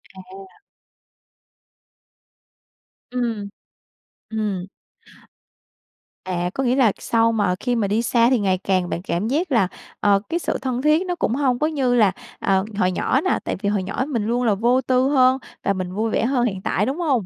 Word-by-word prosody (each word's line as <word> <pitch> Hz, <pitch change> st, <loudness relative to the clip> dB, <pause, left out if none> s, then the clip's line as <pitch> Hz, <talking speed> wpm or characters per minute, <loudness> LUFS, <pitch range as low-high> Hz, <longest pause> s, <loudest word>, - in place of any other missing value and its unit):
À. 190 Hz, +1 st, -13 dB, 2.5 s
Ừm. 230 Hz, -5 st, -2 dB, 0.8 s
Ừm. 210 Hz, -5 st, -2 dB, 1.6 s
À, 180 Hz, -1 st, -2 dB
có 270 Hz, -, -2 dB
nghĩa 250 Hz, 0 st, +2 dB
là 250 Hz, -6 st, +4 dB
sau 230 Hz, 0 st, +2 dB
mà 205 Hz, -5 st, +1 dB
khi 245 Hz, -1 st, -1 dB
mà 215 Hz, -4 st, 0 dB
đi 210 Hz, +3 st, +1 dB
xa 235 Hz, 0 st, +3 dB
thì 255 Hz, -2 st, +3 dB
ngày 190 Hz, -2 st, +1 dB
càng 185 Hz, -1 st, 0 dB
bạn 170 Hz, -, -3 dB
cảm 180 Hz, +2 st, -2 dB
giác 310 Hz, +7 st, -1 dB
là, 225 Hz, -8 st, +3 dB, 0.3 s
ờ, 200 Hz, -1 st, +4 dB
cái 340 Hz, +1 st, 0 dB
sự -, -, -2 dB
thân 255 Hz, -2 st, -2 dB
thiết 305 Hz, +5 st, +3 dB
nó 355 Hz, -, -1 dB
cũng 245 Hz, -8 st, -1 dB
hông 260 Hz, -4 st, +1 dB
có 305 Hz, -, +2 dB
như 270 Hz, -6 st, +1 dB
là, 210 Hz, -5 st, +4 dB, 0.3 s
ờ, 190 Hz, 0 st, +1 dB
hồi 185 Hz, -3 st, +2 dB
nhỏ 260 Hz, +8 st, +1 dB
nè, 370 Hz, -, +1 dB
tại -, -, -2 dB
vì 200 Hz, -, 0 dB
hồi 205 Hz, -2 st, 0 dB
nhỏ 200 Hz, +7 st, -2 dB
mình 235 Hz, -8 st, -2 dB
luôn 240 Hz, +2 st, 0 dB
là 220 Hz, -4 st, +2 dB
vô 240 Hz, +5 st, +2 dB
tư 255 Hz, +1 st, +2 dB
hơn 260 Hz, -2 st, +4 dB, 0.3 s
và 200 Hz, -, +1 dB
mình 185 Hz, -1 st, -4 dB
vui 220 Hz, +3 st, -1 dB
vẻ -, -, +1 dB
hơn 245 Hz, -1 st, +1 dB
hiện 195 Hz, -5 st, -2 dB
tại, 200 Hz, +2 st, 0 dB
đúng 270 Hz, +6 st, -2 dB
hông? 270 Hz, -, +1 dB
230 Hz, 190 wpm, -22 LUFS, 195-255 Hz, 2.5 s, là